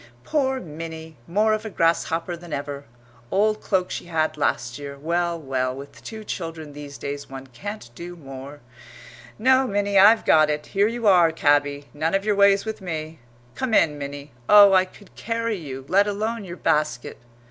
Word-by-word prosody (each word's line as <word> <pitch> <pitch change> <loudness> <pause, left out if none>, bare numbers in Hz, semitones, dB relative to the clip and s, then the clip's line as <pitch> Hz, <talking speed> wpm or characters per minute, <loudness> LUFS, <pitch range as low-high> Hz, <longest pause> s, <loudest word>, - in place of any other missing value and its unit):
"Poor 265 -3 0
Minnie, 160 -2 -8
more 210 +5 +2
of 215 - -2
a 220 - -5
grasshopper 165 -1 0
than 170 -1 -12
ever 140 0 -5 0.4
old 215 +2 +1
cloak 185 -3 0
she - - -5
had 160 -2 0
last 120 -4 -1
year. 140 -1 -7
Well, 170 +3 -1
well, 130 -3 -2
with 140 +1 -11
two 220 -1 -8
children 165 -6 -6
these 145 -1 -9
days 140 0 -6
one 135 0 -8
can't 200 - -8
do 175 +6 -8
more. 140 -1 -10 0.8
No, 260 +3 +4
Minnie, 200 -1 +2
I've 215 +4 +6
got 155 -1 +5
it; 150 0 -2
here 200 +1 +2
you 230 0 -4
are, 175 -5 +6
cabby 145 -2 +1
none 155 +5 0
of 195 +1 0
your 210 -1 +2
ways 200 0 +4
with 220 -2 -5
me. 160 -3 -5 0.3
Come 245 - -1
in, 150 -6 +3
Minnie. 140 0 -7 0.2
Oh, 205 -1 +9
I 185 0 +5
could 195 +2 -18
carry 230 -1 -2
you, 135 -5 -7
let 200 +5 +3
alone 215 +1 -2
your 175 -1 -8
basket!" 150 -6 -1
165 Hz, 180 wpm, -23 LUFS, 145-205 Hz, 0.8 s, Oh